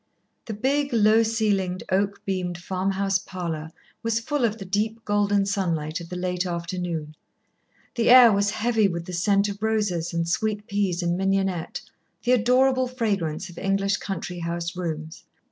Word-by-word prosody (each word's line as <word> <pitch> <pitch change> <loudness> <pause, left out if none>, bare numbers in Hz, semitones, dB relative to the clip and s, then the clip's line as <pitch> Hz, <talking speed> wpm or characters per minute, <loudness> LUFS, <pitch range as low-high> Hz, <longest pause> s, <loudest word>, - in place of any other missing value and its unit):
The 220 - -5
big, 280 +6 0
low 220 0 +5
ceilinged, 205 -5 0
oak 200 +1 0
beamed 180 -2 -2
farm 185 +2 -2
house 195 0 +1
parlour 165 -5 -5 0.3
was 230 0 0
full 280 +2 0
of 220 -1 -1
the 195 - -8
deep 215 +4 -2
golden 205 -1 +2
sunlight 170 -5 -1
of 170 - -10
the 180 - -5
late 180 0 -1
afternoon, 170 -3 -4 0.8
the 235 -2 +1
air 245 -2 +9
was 200 0 +2
heavy 220 0 +2
with 170 -2 -4
the 180 - -7
scent 200 +3 +2
of 200 0 -6
roses 205 -7 0
and 170 -1 -1
sweet 210 +4 -1
peas 195 -4 -1
and 170 0 +1
mignonette, 195 -3 -1 0.4
the 245 - +1
adorable 255 +2 +3
fragrance 200 -10 -2
of 170 - -10
English 195 +1 +1
country 180 -2 -5
house 170 +1 -3
rooms. 160 -2 -5
195 Hz, 160 wpm, -25 LUFS, 175-220 Hz, 0.8 s, air